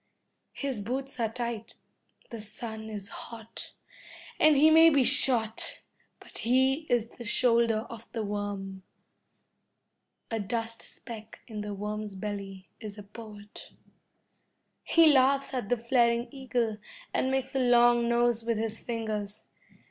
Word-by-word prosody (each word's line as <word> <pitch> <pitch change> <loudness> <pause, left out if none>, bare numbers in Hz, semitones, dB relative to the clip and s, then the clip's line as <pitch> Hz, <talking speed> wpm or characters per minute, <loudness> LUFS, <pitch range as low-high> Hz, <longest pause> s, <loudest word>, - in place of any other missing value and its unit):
His 270 -6 -3
boots 260 +5 -4
are 225 -2 0
tight, 235 -2 -5 0.6
the 230 -2 -6
sun 220 +1 -6
is 205 -2 -7
hot, 225 -1 -9 0.7
and 310 -1 +6
he 310 +3 +6
may 325 +1 +8
be 285 -4 +3
shot, 240 -4 +3 0.4
but - - -11
he 265 +6 +2
is 240 -3 +2
in 235 - -22
the - - -6
shoulder 230 -1 +2
of 230 0 -11
the 225 -2 -3
worm. 200 -2 -4 1.5
A 225 - -1
dust 225 +2 -4
speck 220 -3 -10
in 215 -3 -6
the 210 -1 -5
worm's 210 0 -5
belly 195 -1 -6
is 215 -2 -8
a 205 - -9
poet. 210 0 -12 1.1
He 325 -3 +6
laughs 275 +1 +3
at 245 -6 -3
the 245 - +2
flaring 235 0 +2
eagle 245 -5 -2 0.3
and 260 - +1
makes 265 -1 -1
a 270 - 0
long 240 -1 +4
nose 235 -1 +2
with 230 -1 -1
his 220 0 -4
fingers. 215 -3 -4
230 Hz, 140 wpm, -28 LUFS, 210-250 Hz, 1.5 s, may